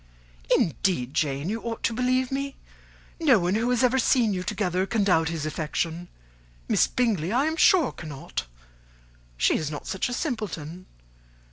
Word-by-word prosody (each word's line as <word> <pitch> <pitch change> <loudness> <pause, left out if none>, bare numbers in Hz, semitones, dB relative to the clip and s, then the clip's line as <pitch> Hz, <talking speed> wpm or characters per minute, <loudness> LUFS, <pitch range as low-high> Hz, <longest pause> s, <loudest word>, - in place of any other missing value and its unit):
"Indeed, 155 -6 0
Jane, 140 0 -1
you 220 +3 -2
ought 230 -1 -5
to 230 - +1
believe 255 +2 +1
me. 275 0 -3 0.6
No 290 -8 +5
one 175 -1 0
who 225 +3 +1
has 250 0 +2
ever 255 +1 +3
seen 230 -3 +3
you 185 - -2
together 190 -1 -1
can 220 -1 +1
doubt 165 -5 +3
his 160 -3 -3
affection; 160 +2 -3 0.6
Miss - - +3
Bingley, 210 -9 0
I 255 +5 +2
am 320 +1 0
sure, 330 -2 +4
cannot: 145 - -6 0.9
she - - +3
is 155 - -3
not 150 -1 -6
such 190 - -2
a - - -3
simpleton. 185 - -4
200 Hz, 160 wpm, -26 LUFS, 165-250 Hz, 0.9 s, No